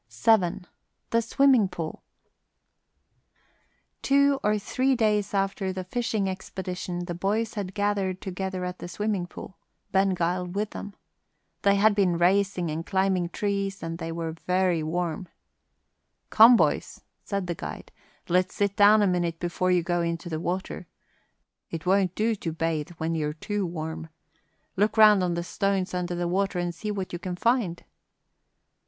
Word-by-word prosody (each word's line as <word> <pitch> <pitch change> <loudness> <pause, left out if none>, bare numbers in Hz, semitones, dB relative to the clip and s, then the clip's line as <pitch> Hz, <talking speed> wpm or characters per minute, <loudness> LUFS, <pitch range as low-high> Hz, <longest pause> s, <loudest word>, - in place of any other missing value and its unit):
VII 175 - +2 0.5
THE 230 - +3
SWIMMING 250 -2 +4
POOL 170 -4 -6 2.0
Two 280 0 +3
or 210 0 +2
three 255 +6 0
days 210 -3 +1
after 195 -1 -1
the 185 0 -4
fishing 215 0 -1
expedition 185 -1 -5
the 175 - -4
boys 210 +6 -1
had 200 -3 -5
gathered 200 -2 0
together 190 -1 -4
at 180 0 -5
the - - -6
swimming 200 0 -2
pool, 175 -1 -11 0.3
Ben 195 -1 +2
Gile 180 +1 -1
with 200 +4 -3
them. 205 - -8 0.7
They 200 0 +4
had 210 +2 +4
been 190 -4 +2
racing, 185 -1 +2
and 160 +2 -3
climbing 190 -2 0
trees, 200 0 -2
and 165 +1 -5 0.2
were 165 -1 -3 0.2
very 180 -2 +2
warm. 170 +2 -2 1.0
"Come, 230 +3 +8
boys," - - 0 0.2
said 200 -2 -2
the 175 - -2
guide, - - -8 0.4
"let's 180 +1 +1
sit 200 -1 0
down 210 +1 +6
a - - +3
minute 175 -2 -1
before 175 +1 -1
you 180 -2 +3
go 175 0 0
into 170 +1 -3
the 160 -1 -3
water. 180 +1 -4 0.8
It 165 +1 -6
won't 190 -1 +2
do 225 +2 +1
to 180 -6 -4
bathe 165 0 -2
when 160 +1 -2
you're 150 -2 -1
too 200 +4 -3
warm. 160 -1 -5 0.7
Look 210 +3 +1
round 210 -3 +7
on 175 -1 0
the 170 - -2
stones 195 0 -1
under 180 -1 -2
the 175 0 -1
water 195 +1 0
and 175 0 -1
see 190 +6 -6
what 195 -3 -4
you 175 - -3
can 180 0 -4
find." 220 -4 0
185 Hz, 155 wpm, -26 LUFS, 175-205 Hz, 2.0 s, Come